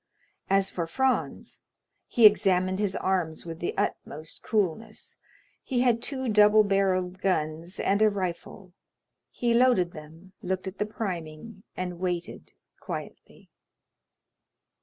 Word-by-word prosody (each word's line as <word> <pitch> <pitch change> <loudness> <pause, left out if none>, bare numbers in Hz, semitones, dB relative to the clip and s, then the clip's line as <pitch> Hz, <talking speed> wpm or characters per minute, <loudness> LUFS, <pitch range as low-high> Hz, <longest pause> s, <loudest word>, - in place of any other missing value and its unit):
As 195 0 +2
for 170 -2 -3
Franz, 265 +8 -1 0.5
he 235 - +4
examined 190 -2 +4
his 200 -2 0
arms 180 -5 -1
with 165 -1 -7
the 175 - -3
utmost 155 +1 -4
coolness; 215 +1 -2 0.5
he 250 -3 -1
had 240 -2 +2
two 265 -1 -3
double 210 0 +6
barrelled 190 -2 0
guns 165 0 -2
and 200 +2 +1
a 215 - +6
rifle; 185 -1 -5 0.6
he 240 -1 0
loaded 235 -8 +3
them, 160 +5 -13
looked 185 +1 -3
at 190 +1 -7
the 210 - 0
priming, 190 -1 -6 0.2
and 180 -1 -4
waited 175 -2 -4 0.3
quietly. - - -9
190 Hz, 120 wpm, -27 LUFS, 175-215 Hz, 0.6 s, double